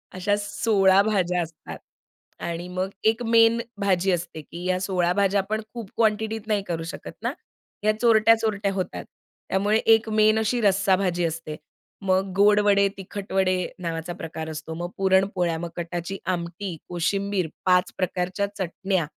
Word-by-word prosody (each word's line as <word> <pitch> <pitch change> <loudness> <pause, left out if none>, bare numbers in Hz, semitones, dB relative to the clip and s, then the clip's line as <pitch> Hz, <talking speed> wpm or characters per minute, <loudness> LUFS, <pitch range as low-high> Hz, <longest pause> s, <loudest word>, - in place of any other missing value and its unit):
अशा 195 +3 +1
16 200 -2 +3
भाज्या 180 -4 +1
असतात. 165 -2 -8 0.6
आणि 170 +1 -4
मग 185 +1 -2 0.2
1 225 +2 -1
मेन 230 0 +5 0.2
भाजी 190 -1 +2
असते 170 -2 -3
की 170 +3 -10
या 185 0 +1
16 180 -2 0
भाज्या 200 +1 +2
आपण 215 +3 -3
खूप 230 -5 -7
क्वांटिटीत 220 0 +1
नाही 210 -2 +1
करू 165 -3 -3
शकत - - -8
ना. - - -1 0.5
या 215 - +4
चोरट्या-चोरट्या 220 -3 +3
होतात. 185 -1 -4 0.4
त्यामुळे 205 +3 +2 0.2
1 225 0 +2
मेन 215 0 +4
अशी 230 +2 0
रस्सा 195 -2 +3
भाजी 180 -2 0
असते. 160 -1 -4 0.5
मग 190 0 +1
गोड 205 +1 +5
वडे, 200 -1 +5
तिखट 195 +1 -7
वडे 190 -1 +2 0.2
नावाचा 165 -1 -4
प्रकार 160 -1 -6
असतो. 155 +1 -6
मग 175 +2 -4
पुरणपोळ्या 190 -3 +2
मग 170 - -4
कटाची 175 +2 -4 0.2
आमटी, 175 +1 -5
कोशिंबीर, 190 +1 -1 0.2
5 180 -1 +3
प्रकारच्या 185 +2 -1
चटण्या, 190 -1 -1
190 Hz, 150 wpm, -24 LUFS, 175-205 Hz, 0.6 s, मेन